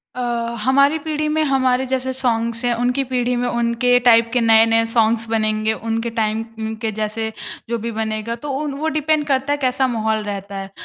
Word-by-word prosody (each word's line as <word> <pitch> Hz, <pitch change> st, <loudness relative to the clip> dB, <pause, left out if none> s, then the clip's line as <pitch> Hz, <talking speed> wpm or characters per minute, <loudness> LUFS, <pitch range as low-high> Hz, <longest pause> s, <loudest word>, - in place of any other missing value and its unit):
अ, -, -, -6 dB, 0.4 s
हमारी 280 Hz, +4 st, +4 dB
पीढ़ी 305 Hz, 0 st, -2 dB
में 310 Hz, +1 st, +1 dB
हमारे 260 Hz, -2 st, +1 dB
जैसे 260 Hz, 0 st, -2 dB
सॉन्ग्स 230 Hz, -2 st, -1 dB
हैं, 245 Hz, -, +2 dB
उनकी 245 Hz, +3 st, 0 dB
पीढ़ी 250 Hz, -1 st, -1 dB
में 245 Hz, 0 st, -1 dB
उनके 235 Hz, +1 st, +2 dB
टाइप 230 Hz, -1 st, +6 dB
के 245 Hz, -, +2 dB
नए-नए 225 Hz, 0 st, +5 dB
सॉन्ग्स 230 Hz, 0 st, +2 dB
बनेंगे, 215 Hz, -1 st, +1 dB
उनके 225 Hz, +1 st, -3 dB
टाइम 220 Hz, -1 st, -1 dB, 0.2 s
उम, 220 Hz, 0 st, -3 dB
के 220 Hz, 0 st, -3 dB
जैसे 215 Hz, +1 st, -3 dB, 0.4 s
जो 235 Hz, -, 0 dB
भी 230 Hz, +2 st, -4 dB
बनेगा 220 Hz, +1 st, -3 dB
तो 290 Hz, -, -3 dB
उन 295 Hz, -2 st, -3 dB
वो 315 Hz, -, -1 dB
डिपेंड 305 Hz, 0 st, +1 dB
करता 270 Hz, 0 st, 0 dB
है -, -, -1 dB
कैसा 260 Hz, -1 st, +1 dB
माहौल 220 Hz, -2 st, -1 dB
रहता 200 Hz, -1 st, -6 dB
है। 195 Hz, 0 st, -9 dB
235 Hz, 195 wpm, -20 LUFS, 220-260 Hz, 0.4 s, टाइप